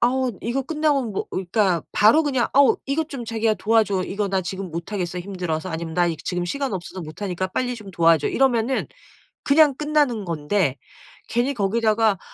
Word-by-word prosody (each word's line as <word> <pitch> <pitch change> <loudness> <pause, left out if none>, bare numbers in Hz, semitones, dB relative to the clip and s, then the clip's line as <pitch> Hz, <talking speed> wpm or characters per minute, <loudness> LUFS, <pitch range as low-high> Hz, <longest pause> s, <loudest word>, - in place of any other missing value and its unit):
아우 255 +1 +2
이거 240 +4 -1
끝나면 290 -5 0
뭐..." - - -2
그니까 185 -2 +1
바로 225 +10 +5
그냥 265 -5 +1
"어우 275 -1 +6
이것 300 +3 -1
좀 255 -4 -6
자기가 225 -1 0
도와줘. 215 -4 +2
이거 200 +1 -2
나 190 -1 0
지금 185 0 -5
못하겠어 175 +1 -4
힘들어서." 180 -2 -4
아니면 160 0 -5
"나 175 -1 +3
이 165 -2 -1
지금 175 +2 -3
시간 275 +8 -2
없어서 185 +1 -6
못 155 +6 -9
하니까 185 -1 -2
빨리 250 +5 -2
좀 210 -3 -10
도와줘." 165 -4 +3
이러면은 255 -1 +1 0.6
그냥 290 -1 +5
끝나는 295 -7 +1
건데 155 -3 0 0.5
괜히 245 +4 0
거기다가 215 -1 +2
210 Hz, 380 characters per minute, -23 LUFS, 180-255 Hz, 0.6 s, 어우